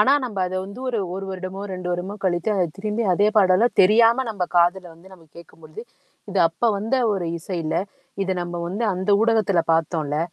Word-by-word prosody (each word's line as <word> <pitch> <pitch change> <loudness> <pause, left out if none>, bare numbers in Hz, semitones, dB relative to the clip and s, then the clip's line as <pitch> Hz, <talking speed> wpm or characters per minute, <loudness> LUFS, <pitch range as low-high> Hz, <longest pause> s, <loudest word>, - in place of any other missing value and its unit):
ஆனா, 260 +6 +5
நம்ப 220 -6 -5
அத 185 - -5
வந்து 200 +6 -10
ஒரு 235 -3 -1 0.2
1 195 - -5
வருடமோ, 185 +1 -6
2 180 -1 -4
வருடமோ 180 +3 -4
கழித்து 175 +2 0
அத 185 -3 +2
திரும்பி 215 +3 -2
அதே 205 +3 +3
பாடல்லாம் 195 +4 +3
தெரியாம 230 +6 +4
நம்ம 195 -4 -2
காதுல 175 +2 +3
வந்து 185 +3 -18
நம்ம 170 -3 -16
கேட்கும்பொழுது, 165 +3 -12 0.5
இது 195 - +1
அப்ப 165 - -25 0.2
வந்த 220 +6 -1 0.2
ஒரு 180 -4 -2
இசை 180 +1 -5
இல்ல. 155 - -2 0.5
இத 190 - -3
நம்ம 175 0 -6
வந்து 215 +5 -2
அந்த 190 +3 -2
ஊடகத்தில 215 -6 +2
பார்த்தோம்ல, 155 -2 -1
190 Hz, 185 wpm, -22 LUFS, 175-210 Hz, 0.5 s, ஆனா